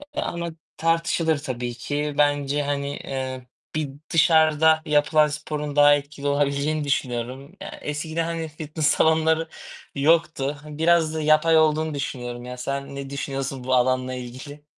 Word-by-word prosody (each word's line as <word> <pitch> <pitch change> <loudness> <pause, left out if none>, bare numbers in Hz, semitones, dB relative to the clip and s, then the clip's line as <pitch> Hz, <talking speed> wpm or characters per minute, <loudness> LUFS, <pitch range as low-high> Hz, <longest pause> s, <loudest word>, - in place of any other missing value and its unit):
eee, - - 0
ama 170 0 -3 0.3
tartışılır 165 -1 +1
tabii 125 -4 -4
ki. 145 +4 -3
Bence, 145 0 +2
hani, 140 0 -2
eee, 130 -1 -5 0.3
bir 155 -3 -1 0.2
dışarıda 160 -1 +4
yapılan 150 0 +3
sporun 150 -1 -4
daha 145 0 +7
etkili 145 0 -5
olabileceğini 145 +2 0
düşünüyorum. 130 +2 -3
Ya - - -8
eskiden, 155 +3 -3
hani, 165 -1 -3
fitness 155 0 -3
salonları 160 +1 +3 0.5
yoktu. 150 -1 +2
Hani, 150 -1 -9
biraz 160 -1 +3
da 160 - -2
yapay 155 +2 +4
olduğunu 155 0 +2
düşünüyorum. 120 -4 -5
Ya 125 0 -7
sen 140 +2 -4
ne 140 0 -6
düşünüyorsun 135 -2 -4
bu 130 - -1
alanla 130 0 +1
ilgili? 130 +4 -8
145 Hz, 140 wpm, -24 LUFS, 140-155 Hz, 0.5 s, daha